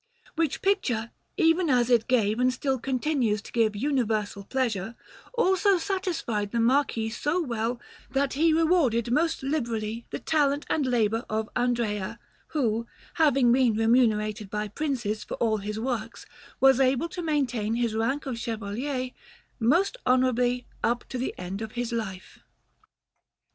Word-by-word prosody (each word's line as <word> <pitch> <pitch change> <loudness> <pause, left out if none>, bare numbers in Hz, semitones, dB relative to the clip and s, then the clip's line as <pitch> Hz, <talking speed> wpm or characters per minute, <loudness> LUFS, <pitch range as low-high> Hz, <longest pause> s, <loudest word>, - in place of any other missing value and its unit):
Which 325 -3 -1
picture, 245 - 0 0.3
even 330 -1 +3
as 250 -2 +3
it 230 -2 +4
gave 220 -3 +2
and 255 0 +3
still 265 0 -1
continues 255 -4 0
to - - -11
give 225 -3 +2
universal 220 -5 -1
pleasure, 230 -2 -2 0.4
also 385 -2 +3
satisfied 335 - -2
the 235 - 0
Marquis 230 -2 +2
so 295 +9 -1
well 235 -5 -2 0.3
that 275 0 0
he 320 +4 +3
rewarded 310 -8 +2
most 320 +3 +1
liberally 235 -5 -2
the - - -4
talent 290 -2 +1
and 290 -4 +1
labour 225 -2 +1
of 215 0 -2
Andrea, 235 -5 -1 0.3
who, 235 -6 -1 0.3
having 275 -5 +4
been 245 -3 +3
remunerated 215 -2 +2
by 210 +1 -3
Princes 235 -5 -2
for - - -5
all 220 -2 +1
his 210 +1 -4
works, 230 -2 -4 0.3
was 270 -1 +6
able 265 +4 +2
to 355 - -5
maintain 250 -9 0
his 235 -2 0
rank 230 +6 -1
of 250 -4 -4
Chevalier 240 +4 -3 0.5
most 335 - +2
honourably 250 -1 +2 0.2
up 240 +1 0
to 255 - -4
the 255 - -3
end 185 +3 -5
of 220 -1 -6
his 245 -1 -3
life. 200 -5 -5
245 Hz, 145 wpm, -27 LUFS, 220-280 Hz, 0.5 s, was